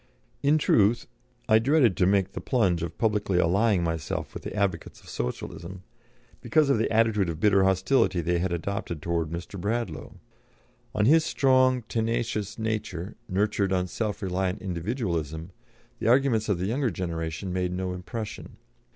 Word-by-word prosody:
In 145 Hz, +2 st, +4 dB
truth, 115 Hz, -5 st, +3 dB, 0.4 s
I 110 Hz, -2 st, +6 dB
dreaded 130 Hz, -, +3 dB
to 90 Hz, -, +3 dB
make 95 Hz, -1 st, +2 dB
the -, -, -6 dB
plunge 95 Hz, -10 st, +1 dB
of 85 Hz, -1 st, -5 dB
publicly 105 Hz, -4 st, +1 dB
allying 95 Hz, +2 st, +3 dB
myself 80 Hz, -2 st, -3 dB
with -, -, -7 dB
the -, -, -6 dB
advocates 100 Hz, -5 st, -2 dB
of -, -, -16 dB
Socialism, 85 Hz, +9 st, -5 dB, 0.6 s
because 155 Hz, -3 st, +3 dB
of 115 Hz, -, +2 dB
the 110 Hz, -, 0 dB
attitude 110 Hz, -4 st, +2 dB
of 80 Hz, -2 st, -4 dB
bitter 100 Hz, -1 st, +4 dB
hostility 95 Hz, +1 st, +2 dB
they 85 Hz, +1 st, 0 dB
had 90 Hz, +1 st, -1 dB
adopted 85 Hz, -1 st, -3 dB
towards 85 Hz, 0 st, -2 dB
Mr. 85 Hz, +2 st, -6 dB
Bradlaugh. 105 Hz, -6 st, -3 dB, 0.8 s
On 105 Hz, -, +2 dB
his 160 Hz, +6 st, +5 dB
strong, 130 Hz, -4 st, +3 dB
tenacious 110 Hz, -2 st, -2 dB
nature, 110 Hz, -4 st, -3 dB
nurtured 100 Hz, 0 st, 0 dB
on 90 Hz, -1 st, +1 dB
self 105 Hz, +3 st, -3 dB
reliant 95 Hz, 0 st, -1 dB
individualism, 85 Hz, -, -3 dB, 0.5 s
the -, -, -2 dB
arguments 120 Hz, -3 st, +3 dB
of 100 Hz, -, +2 dB
the 90 Hz, -, -2 dB
younger 125 Hz, +5 st, 0 dB
generation 85 Hz, 0 st, -4 dB
made 90 Hz, -1 st, -1 dB
no 90 Hz, 0 st, -3 dB
impression. 105 Hz, +4 st, -7 dB
100 Hz, 155 wpm, -26 LUFS, 90-115 Hz, 0.8 s, I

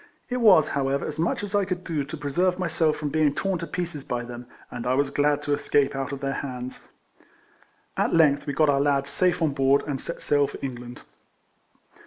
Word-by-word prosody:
It 250 Hz, -, -1 dB
was, 205 Hz, -, +6 dB
however, 140 Hz, 0 st, -1 dB
as 155 Hz, -, -5 dB
much 170 Hz, +4 st, 0 dB
as 205 Hz, 0 st, -5 dB
I 205 Hz, -1 st, +3 dB
could 185 Hz, -1 st, -3 dB
do 155 Hz, -5 st, -2 dB
to 155 Hz, +3 st, -7 dB
preserve 175 Hz, +6 st, 0 dB
myself 160 Hz, -3 st, 0 dB
from 150 Hz, -, -3 dB
being 150 Hz, -1 st, +2 dB
torn 195 Hz, 0 st, -1 dB
to 170 Hz, -, -5 dB
pieces 170 Hz, -3 st, -4 dB
by 120 Hz, -2 st, -3 dB
them, 120 Hz, 0 st, -9 dB, 0.2 s
and 120 Hz, 0 st, -5 dB
I 130 Hz, -, +2 dB
was 140 Hz, 0 st, +1 dB
glad 145 Hz, 0 st, +1 dB
to 145 Hz, -, 0 dB
escape 145 Hz, -1 st, +1 dB
out 135 Hz, 0 st, -3 dB
of 140 Hz, -1 st, -6 dB
their 135 Hz, 0 st, -1 dB
hands. 125 Hz, -2 st, -7 dB, 1.1 s
At -, -, +1 dB
length 150 Hz, -3 st, +4 dB
we 145 Hz, -, -1 dB
got 155 Hz, +2 st, +3 dB
our 140 Hz, -1 st, +3 dB
lads 140 Hz, -1 st, +1 dB
safe 180 Hz, +2 st, +1 dB
on 155 Hz, -, +2 dB
board, 135 Hz, 0 st, +3 dB
and 140 Hz, -3 st, -3 dB
set 170 Hz, -, -6 dB
sail 145 Hz, -1 st, +2 dB
for -, -, -8 dB
England. 125 Hz, -2 st, -7 dB
145 Hz, 215 wpm, -25 LUFS, 135-165 Hz, 1.1 s, was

